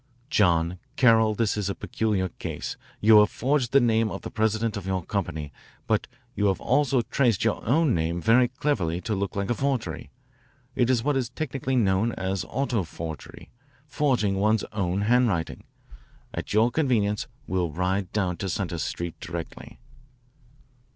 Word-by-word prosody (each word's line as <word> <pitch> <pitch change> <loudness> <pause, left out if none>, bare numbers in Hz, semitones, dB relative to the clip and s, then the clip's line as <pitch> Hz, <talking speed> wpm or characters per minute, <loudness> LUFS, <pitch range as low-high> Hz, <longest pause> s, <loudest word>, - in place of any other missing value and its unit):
John 85 -4 +2 0.2
Carroll, 110 -3 +4
this 110 -1 +1
is 105 -2 -2
a 100 - -2
peculiar 105 -4 -1
case. - - -6 0.3
You 110 0 +8
have 105 0 +5
forged 130 -1 0
the 140 - +6
name 115 -3 +2
of - - -6
the - - -6
president 110 0 0
of 100 -2 -5
your 95 -2 -2
company, 80 -8 -3 0.3
but - - 0 0.3
you 105 0 +1
have 95 - +1
also 135 -2 +2
traced 120 -5 +1
your 115 - 0
own 145 +2 +3
name 85 +1 -1
very 120 +6 +4
cleverly 125 - -1
to 110 - -2
look 100 -1 -2
like 100 +2 -1
a - - +4
forgery. 135 -1 -2 0.7
It 125 0 +2
is 120 -3 +2
what 145 +1 +1
is 130 -3 -1
technically 135 -2 -3
known 110 0 +2
as 95 0 -2
auto 125 -4 0
forgery, 80 -2 -8 0.3
forging 130 -10 +1
one's 105 +2 +2
own 95 -2 -1
handwriting. 110 -6 +1 0.7
At - - -5
your 110 +3 +3
convenience 110 -9 +1 0.2
we'll 90 -2 -1
ride 90 +3 -1
down 90 -4 -1
to 95 - -3
Centre 85 -2 -2
Street 85 +2 -4
directly." 85 0 -7
105 Hz, 160 wpm, -26 LUFS, 95-125 Hz, 0.7 s, You